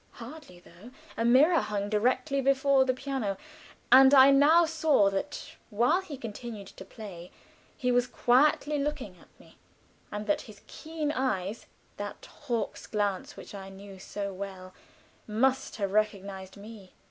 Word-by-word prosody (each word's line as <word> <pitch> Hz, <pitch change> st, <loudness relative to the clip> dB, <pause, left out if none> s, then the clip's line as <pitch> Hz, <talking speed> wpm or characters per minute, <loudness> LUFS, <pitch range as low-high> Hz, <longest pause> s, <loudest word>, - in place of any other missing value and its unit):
Hardly, 245 Hz, -, -11 dB
though 175 Hz, +6 st, -15 dB, 0.3 s
a 230 Hz, -, -2 dB
mirror 285 Hz, +8 st, +5 dB
hung 205 Hz, -1 st, -3 dB
directly 255 Hz, +7 st, 0 dB
before 275 Hz, 0 st, +3 dB
the 255 Hz, -, +1 dB
piano, 260 Hz, -7 st, -3 dB, 0.5 s
and 265 Hz, +2 st, +8 dB
I 270 Hz, +1 st, +8 dB
now 305 Hz, +5 st, +5 dB
saw 310 Hz, -10 st, +2 dB
that 245 Hz, +10 st, -5 dB
while 240 Hz, -, +2 dB
he 310 Hz, -7 st, -9 dB
continued 225 Hz, -3 st, -8 dB
to -, -, -12 dB
play, 190 Hz, -4 st, -10 dB, 0.5 s
he 250 Hz, -1 st, 0 dB
was 245 Hz, 0 st, +2 dB
quietly 295 Hz, +3 st, +2 dB
looking 280 Hz, -10 st, -4 dB
at -, -, -20 dB
me, -, -, -20 dB, 0.5 s
and 210 Hz, 0 st, -5 dB
that 205 Hz, -, 0 dB
his 205 Hz, -2 st, -14 dB
keen 315 Hz, -2 st, -5 dB
eyes 225 Hz, -7 st, -2 dB, 0.3 s
that 205 Hz, 0 st, -7 dB, 0.2 s
hawk's 220 Hz, -4 st, -3 dB
glance 205 Hz, -3 st, -2 dB
which -, -, -11 dB
I 195 Hz, -1 st, -8 dB
knew 195 Hz, 0 st, -12 dB
so 200 Hz, +1 st, -5 dB
well 185 Hz, -1 st, -8 dB, 0.5 s
must 255 Hz, +5 st, 0 dB
have 200 Hz, -3 st, -2 dB
recognized 200 Hz, -2 st, -2 dB
me. 205 Hz, -2 st, -12 dB
230 Hz, 145 wpm, -28 LUFS, 200-275 Hz, 0.5 s, and